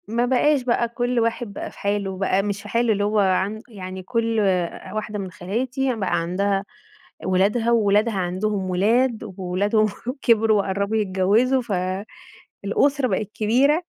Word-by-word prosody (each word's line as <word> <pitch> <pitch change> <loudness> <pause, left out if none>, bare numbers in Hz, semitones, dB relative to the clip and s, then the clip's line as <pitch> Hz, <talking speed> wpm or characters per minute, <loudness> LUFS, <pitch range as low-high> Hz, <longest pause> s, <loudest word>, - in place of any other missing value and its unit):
ما 235 +2 0
بقاش 265 +3 +3
بقى 240 -1 +1
كُلّ 245 +1 -1
واحد 230 -1 -1
بقى - - -6
في - - -16
حاله، 200 -2 -1
بقى 195 0 +1
مش 205 0 -3
في - - -10
حاله 235 -1 +2
اللي 205 0 -1
هو 210 +1 +1
عن 195 +2 +1
يعني 190 -4 -8
كُلّ 230 +1 0 0.5
واحدة 215 -1 -4
من 190 -2 -5
خالاتي 245 +8 -2
بقى 185 -5 0
عندها 195 +3 0 0.6
ولادها، 200 +6 +2
وولادها 215 0 +3
عندهم 190 +1 -1
ولاد، 225 +6 +2
وولادهم 200 +4 +1 0.3
كبروا 220 -3 +4
وقرّبوا 200 +3 -1
يتجوزوا، 210 +6 +2 0.8
فالأسرة 275 +7 0
بقت 210 -4 -2
كبيرة 265 +10 +2
210 Hz, 140 wpm, -23 LUFS, 195-235 Hz, 0.8 s, كبروا